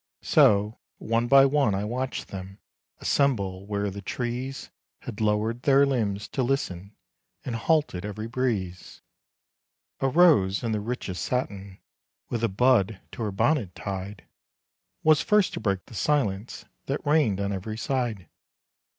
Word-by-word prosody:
So, 105 +2 +4 0.2
one 115 +1 0
by 135 +1 +7
one 140 -7 +2
I 100 - -2
watched 125 +4 -3
them 95 0 -8 0.4
Assemble 100 -9 0
where 100 -1 -2
the 100 +1 -7
trees 125 +5 -4 0.3
Had 105 - -7
lowered 110 +3 0
their 140 +1 +5
limbs 110 -7 -1
to 135 - -2
listen 105 -7 -2 0.5
And 125 - -3
halted 145 - +1
every 105 +1 -5
breeze. 110 -8 -3 1.0
A 135 - +1
Rose 135 - +4
in 115 - -1
the 105 - 0
richest 105 -4 -4
satin, 100 -6 -3 0.5
With 115 -1 -3
a 115 - +2
bud 110 -2 +2
to - - -8
her 105 -2 -1
bonnet 105 - 0
tied, 100 0 -6 0.8
Was 155 0 +5
first 210 0 +2
to - - -4
break 95 -3 -1
the 125 - -15
silence 110 -4 -1 0.2
That 140 +3 -3
reigned 145 -10 +2
on 100 0 -1
every 110 +3 -5
side. 115 - -2
110 Hz, 140 wpm, -26 LUFS, 100-130 Hz, 1.0 s, by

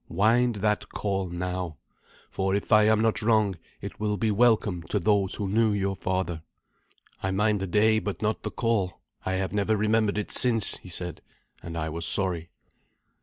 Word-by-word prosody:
Wind 115 +6 +3
that 105 0 0
call 95 -3 -2
now; 90 -2 -4 0.5
for, 95 0 0
if 100 - -3
I 110 0 +6
am 110 0 +4
not 115 -1 +1
wrong, 110 -3 +2 0.3
it - - -8
will 105 -1 -1
be 110 +3 +1
welcome 105 -5 +2
to - - 0
those 100 0 +1
who 100 - -3
knew 110 +2 +2
your 100 -1 -1
father." 95 -3 -2 0.8
"I 95 - -1
mind 105 +2 +1
the 95 - -3
day 110 +4 +3
but 100 -5 -4
not 110 0 -1
the - - -4
call. 110 -6 -1 0.3
I 95 - 0
have 95 0 -2
never 105 +1 +1
remembered 105 0 +1
it 105 - -3
since," 115 -4 +2
he 90 - -13
said, 90 -1 -5 0.4
and 85 0 -7
I 80 -1 -2
was 85 +1 +1
sorry. 90 -4 0
100 Hz, 180 wpm, -26 LUFS, 95-110 Hz, 0.8 s, I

